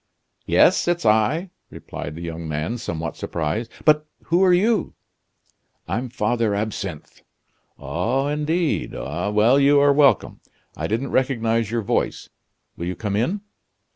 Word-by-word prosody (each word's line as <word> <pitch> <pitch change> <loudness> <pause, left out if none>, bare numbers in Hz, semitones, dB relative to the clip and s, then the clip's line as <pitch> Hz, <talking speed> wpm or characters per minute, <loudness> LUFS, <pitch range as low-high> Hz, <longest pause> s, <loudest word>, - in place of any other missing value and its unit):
"Yes, - - +4
it's 175 -6 0
I!" 110 - +2 0.2
replied 75 - -8
the 85 - -7
young 85 -1 -5
man, 80 +10 -3
somewhat 80 -6 -4
surprised; 85 +8 -3 0.2
"but 155 0 +4 0.2
who 175 +3 +2
are 185 - +5
you?" 205 +3 +2 0.9
"I'm 125 +2 -2
Father 115 -2 0
Absinthe." 100 -6 -5 0.6
"Oh! 135 +4 -1
indeed! 150 +3 -1
Well, 105 +6 +1
you 140 +1 +5
are 140 0 +5
welcome! 140 -6 +3 0.4
I - - -3
didn't 115 +6 -2
recognize 115 -4 +1
your 115 -1 -1
voice - - -1 0.5
will 85 - -5
you 90 - -3
come 100 +1 -3
in?" 170 - 0
115 Hz, 135 wpm, -22 LUFS, 105-145 Hz, 0.9 s, are